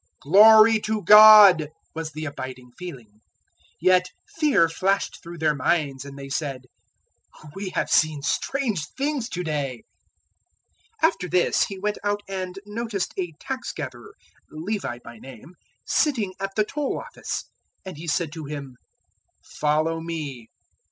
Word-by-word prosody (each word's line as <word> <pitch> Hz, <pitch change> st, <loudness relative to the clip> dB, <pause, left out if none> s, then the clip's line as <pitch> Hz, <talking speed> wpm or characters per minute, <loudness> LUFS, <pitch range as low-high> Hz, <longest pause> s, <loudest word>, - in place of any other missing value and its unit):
"Glory 215 Hz, +7 st, +7 dB
to 215 Hz, -1 st, -3 dB
God!" 210 Hz, -7 st, +9 dB, 0.2 s
was 160 Hz, -1 st, -5 dB
the 155 Hz, +1 st, -5 dB
abiding 130 Hz, -3 st, -8 dB
feeling. 125 Hz, -12 st, -11 dB, 0.6 s
Yet 180 Hz, +1 st, +3 dB, 0.2 s
fear 295 Hz, -, +2 dB
flashed 195 Hz, +4 st, -1 dB
through 170 Hz, 0 st, -10 dB
their 155 Hz, -2 st, +1 dB
minds 140 Hz, -2 st, -1 dB
and 140 Hz, 0 st, -10 dB
they 140 Hz, 0 st, -8 dB
said, 135 Hz, -3 st, -4 dB, 0.9 s
"We 195 Hz, 0 st, -5 dB
have -, -, 0 dB
seen 155 Hz, -2 st, +2 dB
strange 220 Hz, -, -1 dB
things 275 Hz, -3 st, -2 dB
to 180 Hz, -, -4 dB
day." 145 Hz, -6 st, -3 dB, 1.2 s
005:027 -, -, +8 dB
After 180 Hz, -, -5 dB
this 180 Hz, 0 st, +2 dB
He 195 Hz, -, -8 dB
went 210 Hz, +2 st, -3 dB
out 205 Hz, 0 st, -1 dB
and 190 Hz, -1 st, -5 dB
noticed 210 Hz, -2 st, -4 dB
a 175 Hz, -3 st, -4 dB
tax 265 Hz, -2 st, -5 dB
gatherer, 430 Hz, -1 st, -8 dB, 0.3 s
Levi 165 Hz, -, -4 dB
by 115 Hz, -1 st, -12 dB
name, 135 Hz, +6 st, -13 dB, 0.3 s
sitting 230 Hz, -11 st, 0 dB
at 195 Hz, 0 st, -5 dB
the 215 Hz, -, +3 dB
Toll 280 Hz, +6 st, -3 dB
office; -, -, -6 dB, 0.4 s
and 190 Hz, -, -7 dB
He 165 Hz, +3 st, -9 dB
said 160 Hz, 0 st, -1 dB
to 160 Hz, -2 st, -8 dB
him, 140 Hz, -3 st, -8 dB, 0.7 s
"Follow 155 Hz, +2 st, -1 dB
me." 150 Hz, -8 st, -6 dB
175 Hz, 140 wpm, -24 LUFS, 150-210 Hz, 1.2 s, God